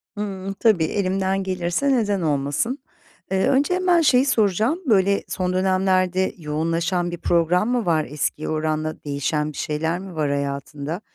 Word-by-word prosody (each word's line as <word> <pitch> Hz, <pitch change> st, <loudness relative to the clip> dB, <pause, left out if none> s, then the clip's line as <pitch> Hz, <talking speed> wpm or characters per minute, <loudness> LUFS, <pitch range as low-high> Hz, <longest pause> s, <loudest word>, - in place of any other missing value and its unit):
Hıı, 195 Hz, -2 st, -4 dB
tabii, 215 Hz, -8 st, +4 dB
elimden 195 Hz, +1 st, 0 dB
gelirse 185 Hz, +8 st, -1 dB
neden 205 Hz, -5 st, 0 dB
olmasın? 145 Hz, -, -1 dB, 0.5 s
Eee, 190 Hz, 0 st, +2 dB
önce 280 Hz, +6 st, +2 dB
hemen 360 Hz, -2 st, +3 dB
şeyi 260 Hz, -4 st, +4 dB
soracağım. 220 Hz, -, +1 dB
Böyle, 200 Hz, -4 st, +3 dB
son 185 Hz, -1 st, -2 dB
dönemlerde 185 Hz, 0 st, +1 dB
yoğunlaşan 165 Hz, +3 st, -1 dB
bir 175 Hz, -, -5 dB
program 175 Hz, +6 st, +2 dB
mı 245 Hz, -4 st, 0 dB
var? 160 Hz, -3 st, +2 dB
Eskiye 150 Hz, +1 st, -2 dB
oranla 155 Hz, 0 st, -2 dB
değişen 150 Hz, +2 st, -1 dB
bir -, -, -12 dB
şeyler 160 Hz, +3 st, -2 dB
mi 190 Hz, -2 st, -9 dB
var 150 Hz, -2 st, 0 dB
hayatında? 140 Hz, +4 st, -3 dB
185 Hz, 145 wpm, -22 LUFS, 155-200 Hz, 0.5 s, tabii